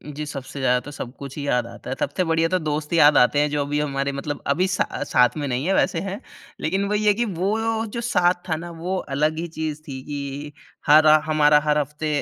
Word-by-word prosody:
जी 150 Hz, +1 st, -4 dB
सबसे 140 Hz, -1 st, -7 dB
ज़्यादा 125 Hz, -1 st, +2 dB
तो 145 Hz, -, -8 dB
सब 125 Hz, -3 st, -7 dB
कुछ 140 Hz, 0 st, -9 dB
ही 145 Hz, -, -4 dB
याद 125 Hz, -3 st, +1 dB
आता -, -, -10 dB
है। 130 Hz, -, -2 dB
सबसे 145 Hz, +6 st, -1 dB
बढ़िया 165 Hz, 0 st, +2 dB
तो 185 Hz, -, +2 dB
दोस्त 150 Hz, -1 st, -3 dB
ही -, -, +3 dB
याद 145 Hz, 0 st, +7 dB
आते 125 Hz, +4 st, +4 dB
हैं 150 Hz, 0 st, +2 dB
जो 145 Hz, 0 st, -1 dB
अभी 145 Hz, +1 st, -1 dB
हमारे 140 Hz, -1 st, -1 dB
मतलब 140 Hz, +1 st, -5 dB
अभी 175 Hz, +7 st, +2 dB
सा 185 Hz, -1 st, 0 dB, 0.2 s
साथ 125 Hz, +4 st, +2 dB
में 145 Hz, -1 st, -2 dB
नहीं 130 Hz, +2 st, -2 dB
है, 195 Hz, -, +2 dB
वैसे 170 Hz, -, +1 dB
है। 195 Hz, +2 st, -5 dB, 0.4 s
लेकिन 190 Hz, +5 st, 0 dB
वही 210 Hz, 0 st, 0 dB
है 210 Hz, -, +5 dB
कि 235 Hz, +4 st, -1 dB
वो 195 Hz, +1 st, -1 dB, 0.4 s
जो 235 Hz, -, -3 dB
साथ 180 Hz, -7 st, +3 dB, 0.2 s
था 160 Hz, -, +1 dB
न 170 Hz, +2 st, -7 dB
वो 180 Hz, +3 st, -2 dB, 0.2 s
अलग 155 Hz, +2 st, +1 dB
ही 170 Hz, -, -3 dB
चीज़ 155 Hz, -2 st, -5 dB
थी 130 Hz, -2 st, -6 dB
कि 145 Hz, 0 st, -6 dB, 0.4 s
हर 155 Hz, +1 st, +7 dB, 0.2 s
हमारा 150 Hz, -1 st, +4 dB
हर 150 Hz, 0 st, +2 dB
हफ़्ते 150 Hz, +1 st, -2 dB
150 Hz, 240 wpm, -23 LUFS, 140-170 Hz, 0.4 s, याद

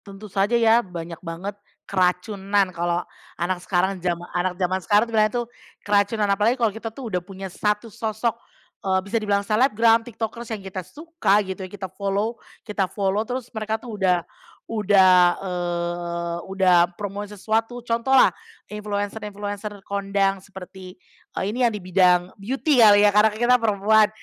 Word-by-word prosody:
tentu 200 Hz, +1 st, -11 dB
saja 205 Hz, +4 st, +2 dB
ya 230 Hz, 0 st, +5 dB
banyak 170 Hz, -5 st, -8 dB
banget 185 Hz, +4 st, -6 dB, 0.3 s
keracunan 195 Hz, +1 st, 0 dB
kalau 175 Hz, 0 st, -1 dB, 0.3 s
anak 180 Hz, +1 st, -2 dB
sekarang 190 Hz, +1 st, 0 dB
jama 175 Hz, -1 st, -2 dB
anak 180 Hz, +1 st, -1 dB
zaman 185 Hz, 0 st, 0 dB
sekarang 205 Hz, +4 st, +3 dB
tuh 230 Hz, -, -10 dB
bilangnya 215 Hz, +1 st, +2 dB
tuh -, -, -20 dB, 0.4 s
keracunan. 205 Hz, +1 st, +2 dB
Apalagi 215 Hz, +5 st, +2 dB
kalau 230 Hz, -4 st, +1 dB
kita 225 Hz, +2 st, -6 dB
tuh 225 Hz, -1 st, -8 dB
udah 180 Hz, -, 0 dB
punya 190 Hz, 0 st, -9 dB
satu 210 Hz, +2 st, -1 dB
sosok, 220 Hz, 0 st, -1 dB, 0.5 s
eee, 190 Hz, -1 st, +1 dB
bisa 200 Hz, -, -3 dB
dibilang 200 Hz, -1 st, 0 dB
selebgram, 225 Hz, +1 st, +3 dB
tiktokers 230 Hz, 0 st, -6 dB
yang 195 Hz, -, -13 dB
kita 190 Hz, 0 st, -5 dB
suka 210 Hz, -, 0 dB
gitu, 190 Hz, 0 st, -6 dB
kita 190 Hz, -1 st, -7 dB
follow 200 Hz, +4 st, -2 dB, 0.2 s
kita 205 Hz, -3 st, -1 dB
follow 200 Hz, +1 st, -1 dB
terus 250 Hz, -1 st, -5 dB
mereka 220 Hz, -1 st, -2 dB
tuh 230 Hz, 0 st, -10 dB
udah 180 Hz, -2 st, +2 dB, 0.4 s
udah, 200 Hz, -4 st, +4 dB, 0.3 s
eee, 175 Hz, -1 st, -3 dB
udah 185 Hz, -2 st, +4 dB
promosi 205 Hz, 0 st, -6 dB
sesuatu. 225 Hz, +4 st, -2 dB
Contohlah 240 Hz, +3 st, +4 dB, 0.4 s
influencer-influencer 205 Hz, -1 st, -5 dB
kondang 195 Hz, -1 st, 0 dB
seperti, 190 Hz, -1 st, -11 dB, 0.4 s
eee, -, -, -1 dB
ini 250 Hz, -, -4 dB
yang -, -, -4 dB
di -, -, -7 dB
bidang 180 Hz, -1 st, +3 dB
beauty 265 Hz, +5 st, +1 dB
kali 210 Hz, -2 st, +7 dB
ya, 205 Hz, -, +5 dB
karena 210 Hz, +1 st, +5 dB
kita 245 Hz, +2 st, +3 dB
perempuan, 215 Hz, 0 st, +3 dB
200 Hz, 155 wpm, -23 LUFS, 185-220 Hz, 0.5 s, kali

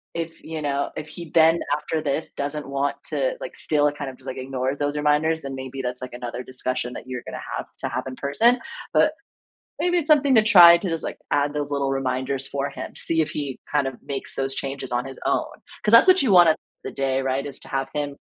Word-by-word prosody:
if, 165 Hz, -1 st, -5 dB
you 160 Hz, -1 st, -5 dB
know, 140 Hz, -1 st, -1 dB
if 155 Hz, -, -5 dB
he 170 Hz, 0 st, -8 dB
then, 165 Hz, +1 st, +5 dB, 0.2 s
after 155 Hz, +1 st, -3 dB
this, 150 Hz, +2 st, -2 dB
doesn't 145 Hz, 0 st, -4 dB
want 140 Hz, +1 st, -1 dB
to -, -, 0 dB
like, -, -, -7 dB
still, 150 Hz, -1 st, +2 dB
kind 145 Hz, -2 st, -6 dB
of, 130 Hz, -, -11 dB
just, 130 Hz, -, -20 dB
like, 130 Hz, -, -5 dB
ignores 130 Hz, +1 st, -3 dB
those 145 Hz, +1 st, -1 dB
reminders, 150 Hz, +2 st, +2 dB
then 135 Hz, -1 st, -5 dB
maybe 130 Hz, 0 st, -6 dB
that's 125 Hz, +1 st, -3 dB
another 120 Hz, 0 st, -5 dB
discussion 130 Hz, -1 st, -3 dB
that -, -, -7 dB
you're 125 Hz, -1 st, -5 dB
gonna -, -, -6 dB, 0.2 s
have -, -, -5 dB
to -, -, -2 dB
have -, -, -3 dB
in 130 Hz, -, -6 dB
person. 230 Hz, -, +3 dB, 0.3 s
But, 305 Hz, -, +4 dB, 0.7 s
maybe 355 Hz, 0 st, +2 dB
it's 310 Hz, -, -2 dB
something 285 Hz, -3 st, +5 dB
to 220 Hz, -, +7 dB
try 175 Hz, -5 st, +9 dB
to 185 Hz, -, -3 dB
just 165 Hz, -1 st, -3 dB, 0.3 s
add 145 Hz, 0 st, +2 dB
those 145 Hz, -1 st, -3 dB
little 140 Hz, -1 st, 0 dB
reminders 135 Hz, 0 st, -1 dB
for 140 Hz, 0 st, -3 dB
him -, -, -7 dB
to -, -, -8 dB
see 160 Hz, -1 st, +1 dB
if 155 Hz, -, 0 dB
he 140 Hz, -3 st, -4 dB
kind 145 Hz, -2 st, +1 dB
of 135 Hz, -, -3 dB
makes 140 Hz, -1 st, -5 dB
those 135 Hz, 0 st, 0 dB
changes 135 Hz, -1 st, -4 dB
on 120 Hz, +1 st, 0 dB
his 135 Hz, -1 st, -9 dB
own. -, -, +2 dB, 0.4 s
'Cause 210 Hz, -, +2 dB
that's 230 Hz, +11 st, +8 dB
what 370 Hz, -5 st, +6 dB
you 230 Hz, -7 st, +2 dB
want 175 Hz, -2 st, +8 dB
at 160 Hz, -, +4 dB, 0.3 s
the -, -, -4 dB
day, 135 Hz, -1 st, 0 dB
right? 135 Hz, +1 st, -1 dB
Is 140 Hz, -, -7 dB
to -, -, -10 dB
have 135 Hz, 0 st, -2 dB
him 145 Hz, -1 st, -3 dB
145 Hz, 235 wpm, -24 LUFS, 135-160 Hz, 0.7 s, try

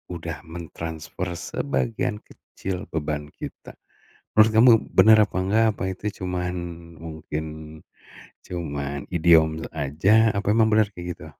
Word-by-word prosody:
udah 80 Hz, -1 st, -5 dB
mentransfer 80 Hz, +1 st, -6 dB
sebagian 115 Hz, +3 st, -2 dB
kecil 95 Hz, +1 st, -7 dB
beban 75 Hz, -2 st, -3 dB
kita. -, -, -9 dB, 0.6 s
Menurut 110 Hz, +1 st, +6 dB
kamu 120 Hz, +2 st, +8 dB, 0.3 s
benar 110 Hz, 0 st, +8 dB
apa -, -, -5 dB
enggak 110 Hz, +3 st, +3 dB
apa -, -, -4 dB
itu 95 Hz, -, -13 dB, 0.2 s
cuman 90 Hz, 0 st, -2 dB, 0.5 s
mungkin 80 Hz, -1 st, -5 dB, 1.0 s
cuman 70 Hz, -5 st, -4 dB, 0.2 s
idiom 80 Hz, -1 st, +4 dB
aja 95 Hz, +10 st, +2 dB
apa 100 Hz, 0 st, -2 dB
emang 115 Hz, -1 st, +4 dB
benar 110 Hz, -1 st, +4 dB
kayak 90 Hz, -2 st, -9 dB
gitu? 80 Hz, -, -12 dB
85 Hz, 120 wpm, -24 LUFS, 80-105 Hz, 1.0 s, kamu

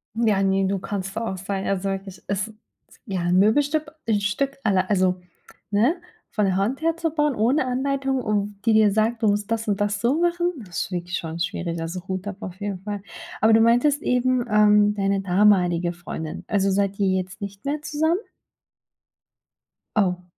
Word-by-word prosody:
Ja, 215 Hz, -4 st, +2 dB
ne, 195 Hz, 0 st, +2 dB
du 195 Hz, +1 st, 0 dB
kannst 195 Hz, 0 st, -5 dB
da 225 Hz, -, -2 dB
auch 190 Hz, -, -5 dB
sein, 195 Hz, +1 st, -4 dB
also 195 Hz, 0 st, -1 dB
wirklich, 195 Hz, -2 st, -5 dB
ist 205 Hz, +2 st, -2 dB, 0.5 s
ja 190 Hz, -3 st, -2 dB
'n 175 Hz, +1 st, +2 dB
Möbelstück, 290 Hz, +9 st, +2 dB, 0.2 s
'n 210 Hz, -2 st, +2 dB
Stück 275 Hz, +7 st, -1 dB
alle 190 Hz, -3 st, +2 dB
also 185 Hz, -2 st, +2 dB, 0.5 s
ne, 235 Hz, -, +3 dB, 0.3 s
von 210 Hz, -2 st, 0 dB
der 190 Hz, -, +1 dB
Hand 225 Hz, +10 st, 0 dB
her 330 Hz, 0 st, +1 dB
zu 330 Hz, -1 st, 0 dB
bauen 295 Hz, -2 st, +1 dB
ohne 255 Hz, +7 st, +2 dB
Anleitung 270 Hz, +1 st, -1 dB
und 205 Hz, -2 st, -2 dB
die 225 Hz, -, +4 dB
dir 215 Hz, -1 st, +5 dB
sagt, 220 Hz, +2 st, 0 dB
du -, -, +4 dB
musst 205 Hz, 0 st, 0 dB
das 225 Hz, 0 st, -1 dB
und 205 Hz, 0 st, 0 dB
das 205 Hz, 0 st, 0 dB
so 260 Hz, +7 st, +2 dB
machen. 345 Hz, 0 st, +1 dB
Das 180 Hz, -7 st, -5 dB
ist -, -, -13 dB
wirklich 175 Hz, 0 st, -3 dB
schon 165 Hz, 0 st, -5 dB
schwierig, 170 Hz, -1 st, -2 dB
also 175 Hz, +3 st, -5 dB
Hut 190 Hz, +1 st, -4 dB
ab 205 Hz, -1 st, -5 dB
auf 185 Hz, -2 st, -7 dB
jeden 200 Hz, -2 st, -3 dB
Fall. 205 Hz, 0 st, -5 dB, 0.4 s
Aber 220 Hz, +2 st, +5 dB
du 225 Hz, -, +6 dB
meintest 245 Hz, +6 st, +3 dB
eben, 250 Hz, 0 st, +1 dB
ähm, 210 Hz, 0 st, +5 dB
deine 195 Hz, -1 st, 0 dB
damalige 180 Hz, -3 st, +3 dB
Freundin. 170 Hz, -2 st, -6 dB
Also, 195 Hz, -1 st, +1 dB
seid 200 Hz, 0 st, 0 dB
ihr 195 Hz, -, +2 dB
jetzt 185 Hz, +2 st, -2 dB
nicht 200 Hz, +2 st, -7 dB
mehr 290 Hz, +2 st, -1 dB
zusammen? 315 Hz, +3 st, +1 dB, 1.8 s
Oh. 180 Hz, -4 st, +1 dB
205 Hz, 190 wpm, -23 LUFS, 190-235 Hz, 1.8 s, du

